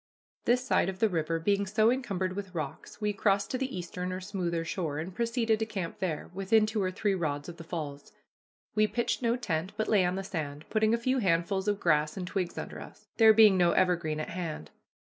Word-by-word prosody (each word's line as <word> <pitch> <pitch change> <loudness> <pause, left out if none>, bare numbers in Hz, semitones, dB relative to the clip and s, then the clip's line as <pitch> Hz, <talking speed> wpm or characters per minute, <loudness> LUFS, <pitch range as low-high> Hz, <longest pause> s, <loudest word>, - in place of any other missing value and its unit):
This 250 +2 +2
side 190 - +2
of 190 - -5
the 220 +2 +3
river 165 -2 0
being 200 +3 +1
so 215 +3 +3
encumbered 195 -8 -2
with 195 -2 -6
rocks, 155 +3 -6
we 210 -1 0
crossed 200 0 +1
to 255 - -1
the 265 -6 -3
eastern 180 +1 -4
or 185 - -3
smoother 180 -4 -2
shore, 165 -5 -3
and 170 +5 -5
proceeded 230 0 +1
to 220 - 0
camp 190 -6 -5
there, 170 -5 -3
within 200 +3 +3
two 215 -1 -1
or 185 - +1
three 200 +2 0
rods 145 -6 -2
of 170 -1 -8
the 165 - -8
falls. 150 -4 -6 0.6
We 215 0 +3
pitched 235 +5 -1
no 235 -1 +2
tent, 185 -5 -2
but 215 - 0
lay 205 -4 +4
on 180 +1 0
the 195 - -3
sand, 155 -6 -5
putting 220 +1 +3
a - - -1
few 255 +3 0
handfuls 190 0 +1
of 205 -1 +1
grass 150 -1 +2
and 185 - -3
twigs 185 -1 -3
under - - -6
us, - - -13
there 225 -1 +8
being 215 -3 +7
no 175 -1 +4
evergreen 170 -4 +1
at 155 - -4
hand. 165 - -5
190 Hz, 220 wpm, -29 LUFS, 170-215 Hz, 0.6 s, there